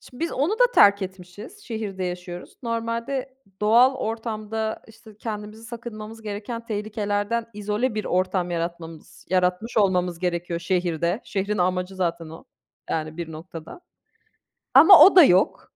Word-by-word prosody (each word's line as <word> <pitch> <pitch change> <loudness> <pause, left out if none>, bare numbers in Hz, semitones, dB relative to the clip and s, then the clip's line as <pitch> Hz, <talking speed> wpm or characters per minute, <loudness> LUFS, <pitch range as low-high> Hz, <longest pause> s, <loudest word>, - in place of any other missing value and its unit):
Şimdi 250 +2 -15
biz 335 - -4
onu 290 +9 0
da - - +4
terk 200 0 +6
etmişiz, 190 - -9
şehirde 210 -5 -4
yaşıyoruz. 180 0 -7
Normalde 230 +3 -3 0.3
doğal 235 +5 +5
ortamda, 220 -2 -4
işte, 220 -1 -16
kendimizi 215 0 -7
sakınmamız 225 -2 -9
gereken 215 +2 -6
tehlikelerden 210 +1 -2
izole 210 +4 -2
bir 215 - -3
ortam 185 -1 0
yaratmamız 165 -1 -6
yaratmış 185 +4 0
olmamız 180 -4 +1
gerekiyor 170 -1 -2
şehirde. 175 +1 -1
Şehrin 200 +1 -2
amacı 180 +1 -1
zaten 170 -3 -2
o, 160 +1 -12 0.5
yani 155 0 -3
bir 170 -2 -6
noktada. 165 - -10 0.9
Ama 325 +8 +9
o 385 - +5
da 360 - +10
yok. 185 -8 +2
205 Hz, 135 wpm, -24 LUFS, 180-230 Hz, 0.9 s, da